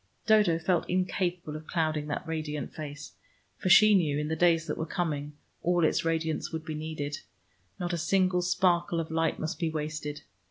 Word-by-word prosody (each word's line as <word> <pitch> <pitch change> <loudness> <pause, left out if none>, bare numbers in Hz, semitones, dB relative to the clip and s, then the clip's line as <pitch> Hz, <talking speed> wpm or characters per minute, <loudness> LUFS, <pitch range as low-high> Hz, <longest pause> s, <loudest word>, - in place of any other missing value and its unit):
Dodo 210 -7 +4
felt 170 +2 0
incapable 180 -3 -1
of 155 0 -8
clouding 155 -3 -1
that 150 +4 -3
radiant 155 -2 -4
face, 145 -1 -7 0.5
for 185 - -1
she 215 +3 +8
knew 155 -7 +3
in 150 0 -2
the 160 - 0
days 165 0 +3
that - - -3
were 160 - -2
coming, 150 -5 -2 0.3
all 175 -1 +2
its - - +1
radiance 160 -1 -1
would 160 -1 -5
be 155 - -4
needed: 150 -2 -4 0.6
not 175 -1 -2
a 170 - -1
single 185 +1 +2
sparkle 175 -1 +2
of 160 -1 -4
light 165 0 +1
must 155 - -4
be 165 - 0
wasted. 150 -1 -4
160 Hz, 185 wpm, -29 LUFS, 155-175 Hz, 0.6 s, she